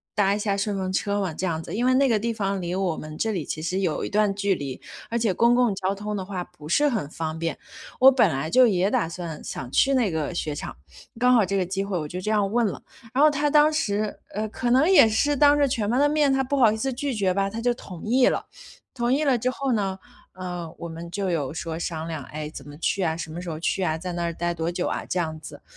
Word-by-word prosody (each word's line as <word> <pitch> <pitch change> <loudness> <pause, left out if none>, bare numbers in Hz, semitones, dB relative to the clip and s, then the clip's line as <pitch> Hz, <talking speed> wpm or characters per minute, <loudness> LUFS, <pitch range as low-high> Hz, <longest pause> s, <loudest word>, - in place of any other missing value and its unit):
搭 200 -2 +3
一 205 - -1
下 205 -1 0
顺 200 0 -1
风 185 -1 -2
车 200 +1 0
吗 190 -5 -2
这 185 - -3
样 165 -3 -1
子。 - - -7
因 240 +3 0
为 255 - +4
那 275 +1 +4
个 230 -4 +3
地 230 +2 -1
方 200 -3 -2
离 175 0 -3
我 185 -3 0
们 155 0 -8
这 220 +4 0
里 175 -6 -2
其 155 - -5
实 185 +4 -1
有 170 -5 -1
一 - - -4
段 210 -1 +2
距 200 -1 0
离， 140 -5 -6 0.3
而 235 - -1
且 220 -4 +1
公 235 +6 +4
共 245 -5 +2
交 190 +1 -1
通 210 +1 -4
的 190 - -3
话 185 -1 -5
不 150 0 -13
是 295 - +3
很 215 - -1
方 160 0 -4
便， 165 -2 -2 0.4
我 265 +1 +9
本 250 -7 +4
来 145 +1 -2
就 255 +4 +6
也 190 -3 +2
打 165 -5 0
算 170 -3 -6
想 130 - -6
去 275 0 +4
那 245 -6 +2
个 160 0 -2
雪 155 -3 -3
场， - - -7 0.4
刚 250 +1 +5
好 225 -5 +5
这 195 +2 -1
个 185 - +1
机 195 +2 -2
会 195 -3 -2
我 150 - -4
就 180 +4 -6
这 215 - -2
样 205 -2 +2
问 235 +1 +2
了， 200 - -3 0.3
然 270 - +2
后 305 - +8
他 295 0 0
当 300 +1 +5
时， 210 -8 -1
呃， 215 +2 -3
可 240 +3 -2
能 270 +7 +4
也 335 -12 +7
是 290 +7 +2
当 290 +1 +5
着 285 - +4
全 220 -5 -1
班 245 +4 +2
的 290 - +5
面， 295 -2 +2
他 270 - +2
不 280 - -1
好 235 -5 +6
意 220 - -2
思 265 +3 -2
拒 275 +2 -2
绝 195 -5 +1
吧， 195 +1 0
他 225 +3 -5
就 245 +1 +1
同 180 -7 -10
意 250 +3 +4
了。 - - 0 0.5
同 240 -1 0
意 285 +4 +2
了 265 -5 +2
之 250 +3 0
后 270 0 -2
呢， 195 -3 -1 0.4
呃， 180 -3 -6
我 170 - -6
们 165 +1 -8
就 190 0 -2
有 145 -5 -1
说 160 +1 -5
商 165 -1 -4
量， 160 -4 -5
诶， 150 +2 -6
怎 140 -2 -10
么 145 - -11
去 180 +4 -1
啊， 160 -2 0
什 160 -1 -6
么 170 - -6
时 180 - -6
候 155 -1 -5
去 190 +3 -1
啊， 160 -3 0
在 180 +2 -5
那 175 0 -2
儿 170 - -2
呆 175 +1 -2
多 165 0 -2
久 175 0 -2
啊 - - -2
这 - - -4
样 160 -2 -3
子。 145 -2 -11
195 Hz, 305 characters per minute, -25 LUFS, 170-235 Hz, 0.5 s, 我